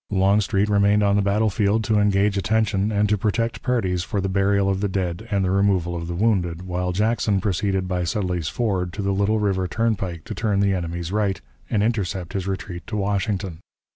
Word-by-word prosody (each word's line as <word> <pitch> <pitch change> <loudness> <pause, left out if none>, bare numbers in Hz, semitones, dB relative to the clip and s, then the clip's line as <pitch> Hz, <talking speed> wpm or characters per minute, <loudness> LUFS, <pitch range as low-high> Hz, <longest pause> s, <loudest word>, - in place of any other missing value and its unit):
Longstreet 100 0 +2
remained 105 0 +3
on 100 0 +3
the 105 - +3
battle 105 +2 +1
field 105 +3 +1
to 110 -1 +2
engage 100 0 +2
attention 105 0 +1
and 105 0 +2
to 105 0 +1
protect 115 +3 -1
parties 95 -9 0
for 100 +3 -2
the 95 - -1
burial 100 +1 +2
of 95 0 0
the 105 - +1
dead 90 -3 -3
and 100 -2 +1
the 90 - 0
removal 95 -3 +1
of 85 -1 -4
the 85 - -4
wounded, 90 -4 0
while 90 0 -2
Jackson 105 +1 +1
proceeded 95 -1 -1
by 90 -1 -1
Sudley's 90 -1 -1
Ford 95 -7 -1
to 105 - -4
the 100 0 0
Little 100 +3 +1
River 95 -3 0
turnpike 95 -6 -1
to - - -6
turn 105 -3 0
the 100 -1 +2
enemy's 85 -1 -3
right, 100 -2 0 0.3
and 105 -3 +1
intercept 95 -6 -2
his 95 -1 -3
retreat 95 -2 -5
to 105 - -3
Washington. 100 -3 -1
100 Hz, 200 wpm, -23 LUFS, 90-105 Hz, 0.3 s, remained